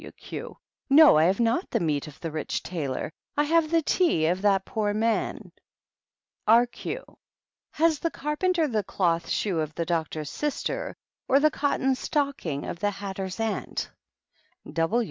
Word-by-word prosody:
TT. - - -12
Q. - - -8 0.3
No, 300 +1 +8
I 155 - +5
have 190 +5 +2
not 235 +10 +1
the 230 - 0
meat 155 -4 -1
of 150 0 -12
the 165 - -4
rich 155 0 -3
tailor; 155 -4 -3 0.3
I 295 - +4
have 320 +1 +2
the 330 0 +2
tea 290 - +2
of 180 +3 +1
that 195 -2 +3
poor 210 -2 -1
man. 225 +1 -1 1.0
B, 230 +3 +7
Q, - - -5 0.7
Has 320 -1 +2
the 335 - 0
carpenter 320 +3 0
the 220 -6 0
cloth 170 -4 0
shoe 190 -6 0
of 155 0 -3
the 170 - -1
doc 165 -2 0
tor's 155 -3 -5
sister 400 - -3 0.3
or 275 - +5
the 305 +1 +4
cotton 270 -2 +1
stocking 270 - -2
of 170 - -5
the 205 +2 +1
hatter's 195 -1 -5
aunt? 220 -3 -2
210 Hz, 165 wpm, -26 LUFS, -, 1.0 s, No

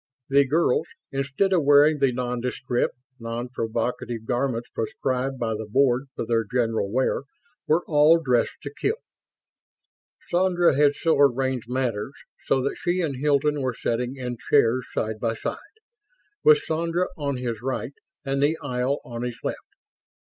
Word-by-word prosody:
The 140 0 +4
girls, 155 -1 +2 0.2
instead 140 +8 0
of 175 -4 +3
wearing 145 +2 +5
the 135 -2 +3
nondescript, 125 0 -2 0.2
non 115 +1 -4
provocative 115 -1 -3
garments 120 -1 -1
prescribed 130 +3 -2
by 115 -2 -1
the 110 0 -5
Board 130 +2 +2
for - - -3
their 115 0 +1
general 115 -2 -1
wear, 130 +2 +1 0.5
were 165 +3 +3
all 155 +2 +5
dressed 125 -7 +1
to 145 - -6
kill. 425 - -1 1.3
Sandra 175 -3 +3
had 145 0 +4
so 165 -3 +1
arranged 130 -3 +2
matters 125 -2 -2 0.4
that 135 +1 +1
she 180 +1 0
and 145 -6 -2
Hilton 145 +1 +1
were 130 -2 -1
sitting 120 +3 -2
in 125 -2 -5
chairs 130 -3 +3
side 110 0 -2
by 115 0 -1
side, - - -4 0.9
with 450 -1 +6
Sandra 170 +3 0
on 140 -3 -2
his 120 -4 -4
right 130 +1 -3 0.3
and 135 0 0
the 150 +3 +2
aisle 130 0 -2
on 120 -1 -6
his 125 -1 -4
left. - - -2
130 Hz, 150 wpm, -25 LUFS, 120-145 Hz, 1.3 s, with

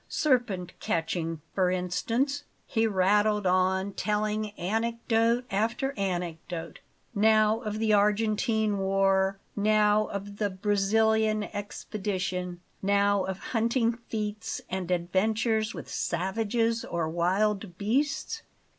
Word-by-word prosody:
Serpent 240 - +1
catching, 165 -1 -2
for 185 -2 +2
instance 225 +11 -1
" - - -40
He 225 -2 +1
rattled 205 +1 +2
on, 190 +2 +2
telling 210 +1 -1
anecdote 230 +4 +1
after 230 +7 0
anecdote; 175 -3 -4 0.3
now 215 0 +4
of 215 -3 -4
the 220 -1 +2
Argentine 210 0 +2
war, 195 0 +2 0.2
now 210 0 +3
of 200 0 -6
the 205 -1 0
Brazilian 215 +2 +2
expedition, 190 -3 -4 0.2
now 200 0 +2
of 190 -1 -3 0.2
hunting 230 +1 +2 0.2
feats 215 0 -3
and 185 -1 -3
adventures 215 +5 +1
with - - -7
savages 225 +6 -1
or 170 -2 -2
wild 185 +3 0
beasts. 285 - -1
210 Hz, 105 wpm, -28 LUFS, 190-220 Hz, 0.3 s, now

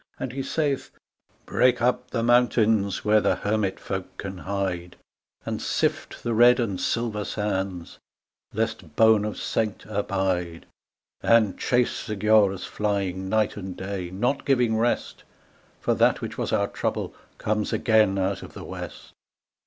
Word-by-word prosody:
And 130 - -3
he 135 - -3
saith, 145 -1 -1 0.3
" - - -57 0.2
Break 125 -1 +3
up 125 +1 0
the 115 -2 -1
mountains 115 -4 +3
where 105 0 +5
the 95 - +2
hermit 105 0 -1
folk 95 -1 -5
can 95 -2 -6
hide, 95 -3 -3 0.5
And - - -3
sift - - -1
the 120 - -1
red 120 +2 +6
and 100 -6 -1
silver 115 -3 -1
sands 95 -4 -3 0.5
lest 110 -7 -3
bone 110 -2 +5
of 105 - -4
saint 110 -2 -2
abide, 95 -5 -2 0.6
And 115 -4 +4
chase 125 -1 0
the 110 - -2
Giaours 100 -2 +3
flying 95 -3 -2
night 110 0 +1
and 95 -2 -6
day, 95 -2 -4
not 120 +9 -1
giving 125 -5 +2
rest, 115 +2 -1 0.6
For - - +1
that - - +3
which - - -5
was - - -3
our - - +2
trouble - - -3 0.2
comes 105 0 -1
again 110 -3 +3
out 95 0 -1
of - - -10
the - - -8
west. - - -8
105 Hz, 150 wpm, -25 LUFS, 95-115 Hz, 0.6 s, red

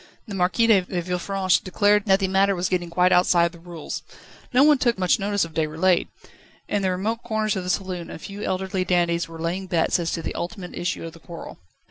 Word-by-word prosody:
The 205 - -7
Marquis 190 +5 +2
de 215 -4 +5
Villefranche 180 +1 -1
declared 205 +2 +2
that 190 0 +5
the 195 - 0
matter 195 +1 +3
was 180 +1 -1
getting 175 -2 -1
quite 180 +2 +3
outside 175 -1 +4
the 170 - -14
rules. 170 -2 -7 0.5
No 255 +1 +5
one 295 -2 +5
took 240 -3 +2
much 185 -2 +2
notice 200 -1 0
of 165 - -12
Déroulède. 160 +3 +1 0.6
In 205 - 0
the 190 - +1
remote 210 +6 -2
corners 220 -2 -1
of 190 - -3
the 180 - -5
saloon 185 -2 -2
a - - -7
few 200 +5 -8
elderly 190 -1 -1
dandies 175 -1 +1
were 165 0 -10
laying 175 +4 -3
bets 170 0 +1
as 170 -1 -1
to 165 - -3
the - - -3
ultimate 180 0 -6
issue 175 -1 -3
of 165 - -8
the 165 - -14
quarrel. 170 +1 -10
185 Hz, 215 wpm, -24 LUFS, 175-195 Hz, 0.6 s, de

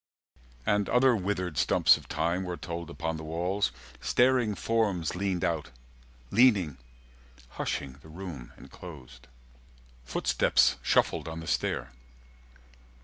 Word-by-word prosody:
And 105 -1 +1
other 125 +1 +5
withered 90 -6 -2
stumps 65 - +5
of - - -10
time 85 +4 -1
Were 90 -1 -4
told 85 -1 -6
upon 80 +3 -3
the 80 - -7
walls; 90 +4 -1 0.3
staring 125 -4 +3
forms 100 -8 0
Leaned 95 -2 -1
out, 80 -4 -1 0.6
leaning, 100 - +4 0.7
hushing 70 -1 -4
the 80 - -15
room 80 -7 -8
enclosed. 65 -8 -12 0.8
Footsteps 65 - +2
shuffled - - +2
on 80 0 -5
the 80 - -7
stair. 65 -5 -1
85 Hz, 115 wpm, -29 LUFS, 80-100 Hz, 0.8 s, other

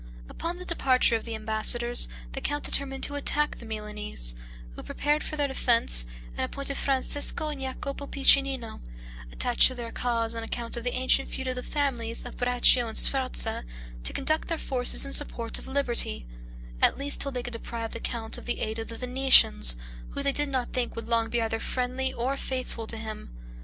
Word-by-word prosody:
Upon 340 +1 -6
the 360 - -10
departure 260 -8 +1
of 225 - -4
the 230 -1 -5
ambassadors, 220 - +5 0.2
the - - -6
count 290 0 -3
determined 270 -1 0
to 285 - +2
attack 295 +1 -1
the 235 - -12
Milanese, 210 - -2 0.4
who - - -11
prepared 295 +2 -2
for 310 - -6
their 290 -1 0
defense, 230 - +3 0.3
and - - -11
appointed 275 0 -2
Francesco 285 +3 +1
and 290 -3 -7
Jacopo 275 +2 -6
Piccinino 270 -4 +1 0.5
(attached 245 -1 +2
to 255 - -4
their 235 -2 -7
cause, 230 -2 -2
on 230 - -5
account 230 +1 -4
of 235 - -5
the 245 - -2
ancient 260 +1 +1
feud 265 - -6
of - - -2
the 250 - -6
families 245 -6 -4
of 245 - -9
Braccio 245 0 +3
and 220 - -3
Sforza) 265 - +4 0.4
to - - +1
conduct 310 +3 -1
their 330 - -2
forces 255 -2 +2
in 275 - -7
support 235 -6 +1
of - - -12
liberty; 240 - -1 0.6
at - - +5
least 285 +1 -3
till 280 - 0
they 250 -2 -5
could 245 - -7
deprive 230 0 -7
the - - -6
count 225 -1 -4
of - - -14
the 240 - -2
aid 220 +1 -4
of 225 - -6
the 230 - -8
Venetians, 250 - +6 0.4
who 280 - -4
they 280 - 0
did 290 +1 -1
not 255 -3 -4
think 250 -2 -3
would 230 - -7
long 230 -1 0
be 235 0 -1
either 225 0 -3
friendly 255 +2 -3
or 255 +4 -3
faithful 255 -4 -5
to 225 - -2
him. 220 - -8
250 Hz, 195 wpm, -26 LUFS, 230-275 Hz, 0.6 s, Venetians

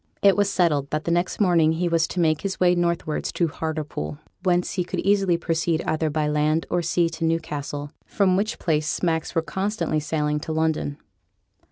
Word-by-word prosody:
It 200 -1 +6
was 205 -1 +2
settled 150 -8 +1
that 155 0 -2
the 170 - -1
next 175 +1 0
morning 170 -5 +4
he 175 +2 0
was 165 -1 +2
to 180 - -4
make 155 -3 +2
his 195 -1 -3
way 180 -1 +5
northwards 170 -3 -1
to 170 - +1
Hartlepool, 155 -1 -4 0.2
whence 180 -1 +1
he 185 - 0
could 175 - -4
easily 195 -3 +2
proceed 165 -1 0
either 155 0 0
by 150 0 0
land 150 +2 +1
or 175 - +2
sea 170 0 +1
to 165 - -6
Newcastle, 145 -3 -2 0.2
from 190 -3 +2
which 215 +4 -1
place 155 -2 0
smacks 160 +1 -1
were 165 - +2
constantly 195 -3 -1
sailing 150 0 -1
to 155 - -6
London. 160 -2 0
165 Hz, 190 wpm, -24 LUFS, 155-180 Hz, 0.2 s, It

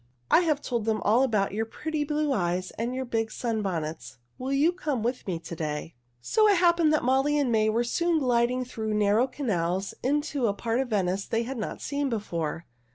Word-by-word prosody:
"I - - +7
have 310 -5 0
told 235 -4 -2
them 220 -1 +1
all 225 +5 +4
about 215 -7 +1
your 220 +2 -1
pretty 310 +5 -3
blue 295 -1 0
eyes 180 -3 -1
and 235 +3 -3
your 260 0 -2
big 225 -2 -1
sunbonnets. 180 - -3 0.2
Will 260 +1 -3
you 285 +5 +4
come 300 -10 -2
with 245 0 -2
me 180 -3 -1
to 170 +1 -8
day?" 155 0 -4 0.3
So 430 - +3
it 405 -2 +5
happened 340 -3 +4
that 310 - +2
Molly 270 +4 +2
and 275 -4 +1
May 215 -1 +3
were 230 +2 +1
soon 340 +7 +1
gliding 250 -2 +1
through 220 -3 -3
narrow 210 +4 +3
canals 195 - -2
into 285 -1 0
a 200 - 0
part 230 +3 -1
of 265 - 0
Venice 195 -2 0
they 230 +1 0
had 255 +1 -5
not 215 - -5
seen 285 -1 -1
before. 170 -8 -3
235 Hz, 205 wpm, -27 LUFS, 205-280 Hz, 0.3 s, I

